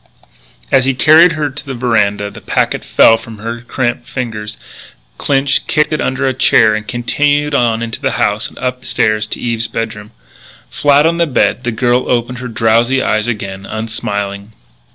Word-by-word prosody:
As 130 Hz, -2 st, +4 dB
he 135 Hz, -1 st, +1 dB
carried 155 Hz, +8 st, +6 dB
her 150 Hz, -2 st, -2 dB
to 145 Hz, +2 st, -8 dB
the 135 Hz, -3 st, -6 dB
veranda 105 Hz, -4 st, 0 dB
the -, -, -12 dB
packet -, -, -1 dB
fell 115 Hz, -, +5 dB
from 115 Hz, -1 st, -11 dB
her 115 Hz, +2 st, -6 dB
cramped 120 Hz, 0 st, -3 dB
fingers. 110 Hz, -4 st, -5 dB, 0.6 s
Clinch 140 Hz, 0 st, +1 dB
kicked 150 Hz, 0 st, +1 dB
it 155 Hz, -, -1 dB
under 130 Hz, +1 st, -1 dB
a 130 Hz, -, +1 dB
chair 110 Hz, -3 st, +4 dB
and 110 Hz, 0 st, -4 dB
continued 145 Hz, +4 st, 0 dB
on 115 Hz, -4 st, +1 dB
into 115 Hz, 0 st, -5 dB
the -, -, -1 dB
house -, -, 0 dB
and -, -, -19 dB
up 125 Hz, 0 st, -3 dB
the -, -, -12 dB
stairs 110 Hz, 0 st, 0 dB
to -, -, -6 dB
Eve's 115 Hz, -1 st, -2 dB
bedroom. 110 Hz, -2 st, -5 dB, 0.6 s
Flat 145 Hz, +1 st, +3 dB
on 170 Hz, +1 st, +2 dB
the 170 Hz, -1 st, +1 dB
bed, 125 Hz, -2 st, 0 dB
the 120 Hz, -, 0 dB
girl 120 Hz, +2 st, 0 dB
opened 120 Hz, 0 st, -1 dB
her 125 Hz, -, -5 dB
drowsy 115 Hz, +3 st, +2 dB
eyes 110 Hz, -3 st, 0 dB
again, 100 Hz, -4 st, -5 dB
unsmiling. 105 Hz, -2 st, -4 dB
120 Hz, 180 wpm, -14 LUFS, 110-135 Hz, 0.6 s, carried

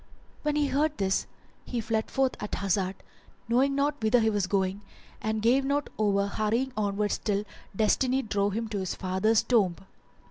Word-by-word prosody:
When 300 Hz, -1 st, 0 dB
he 295 Hz, -1 st, +2 dB
heard 295 Hz, +2 st, 0 dB
this 190 Hz, -1 st, 0 dB, 0.4 s
he 245 Hz, -, -3 dB
fled 220 Hz, 0 st, -1 dB
forth 270 Hz, -1 st, +1 dB
at 210 Hz, -, -3 dB
hazard, 195 Hz, -1 st, 0 dB, 0.5 s
knowing 265 Hz, +4 st, +2 dB
not 285 Hz, +1 st, 0 dB
whither 220 Hz, +3 st, +4 dB
he 220 Hz, -1 st, +2 dB
was 205 Hz, -3 st, 0 dB
going, 190 Hz, 0 st, 0 dB, 0.4 s
and 220 Hz, 0 st, -1 dB
gave 255 Hz, +4 st, +4 dB
not 280 Hz, +1 st, -1 dB
over 200 Hz, -2 st, +2 dB
hurrying 220 Hz, +6 st, -1 dB
onwards 205 Hz, -1 st, 0 dB
till 205 Hz, -2 st, 0 dB, 0.3 s
Destiny 255 Hz, +5 st, +2 dB
drove 205 Hz, -2 st, 0 dB
him 225 Hz, +2 st, -2 dB
to 205 Hz, -2 st, -2 dB
his 185 Hz, -2 st, -3 dB
father's 190 Hz, +4 st, +1 dB
tomb. 200 Hz, -8 st, +2 dB
220 Hz, 170 wpm, -28 LUFS, 200-260 Hz, 0.5 s, whither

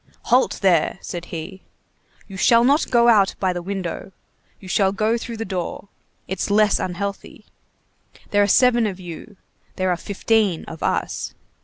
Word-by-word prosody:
"Halt 255 Hz, -, +3 dB
there," 175 Hz, -3 st, +3 dB
said 175 Hz, -1 st, -6 dB
he. 175 Hz, +3 st, -7 dB, 0.7 s
"You 195 Hz, -, -10 dB
shall 230 Hz, +4 st, +4 dB
not 285 Hz, +5 st, +3 dB
go 235 Hz, -1 st, +4 dB
out 205 Hz, -4 st, +4 dB
by 185 Hz, -2 st, +1 dB
the 175 Hz, -, -4 dB
window, 190 Hz, 0 st, -5 dB, 0.5 s
you 190 Hz, -, -12 dB
shall 190 Hz, +1 st, +2 dB
go 215 Hz, +3 st, 0 dB
through 235 Hz, 0 st, -5 dB
the 225 Hz, -, -4 dB
door. 190 Hz, +1 st, -5 dB, 0.4 s
It's 190 Hz, +1 st, -3 dB
less 210 Hz, 0 st, +3 dB
unhealthy. 195 Hz, +2 st, -5 dB, 0.9 s
There 205 Hz, -, +3 dB
are 200 Hz, -, +3 dB
seven 240 Hz, +1 st, +4 dB
of 190 Hz, -2 st, -5 dB
you, 180 Hz, +3 st, -10 dB, 0.4 s
there 185 Hz, -1 st, 0 dB
are 175 Hz, -, 0 dB
fifteen 205 Hz, -1 st, 0 dB
of 160 Hz, -, -10 dB
us. -, -, -2 dB
195 Hz, 160 wpm, -21 LUFS, 180-220 Hz, 0.9 s, shall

